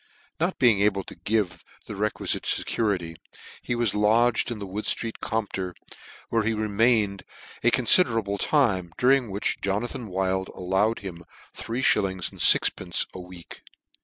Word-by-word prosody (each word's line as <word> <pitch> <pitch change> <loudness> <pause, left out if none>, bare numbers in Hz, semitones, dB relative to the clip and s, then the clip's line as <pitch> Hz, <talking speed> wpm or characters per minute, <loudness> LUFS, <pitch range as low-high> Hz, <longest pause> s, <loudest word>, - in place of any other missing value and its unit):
Not - - 0
being 115 -5 +4
able 100 -2 +2
to - - -10
give 90 -1 -1 0.2
the - - -7
requifite 105 +1 -2
fecurity, 90 -7 -1 0.4
he 120 - -2
WHS 120 -3 +1
lodged 115 +4 +2
in 120 - -4
Wood 100 +1 -6
ftreet 115 -1 -2
Compter, 100 -5 -3 0.5
where 115 - +1
he 110 +1 0
remained 105 -1 +1 0.4
a 120 - +5
considerable 115 - +3
time, 95 - +1
during 130 -2 +3
which 100 +2 -2
Jo 100 0 0
nathan 120 +1 -5
Wild 95 0 -1
allowed 95 +5 0
him 90 -4 -8 0.3
three 120 +3 -4
millings 95 -4 -2
and - - -10
fix - - +5
pence - - -1
a - - -8
week. 90 -1 -11
105 Hz, 150 wpm, -25 LUFS, 95-115 Hz, 0.5 s, a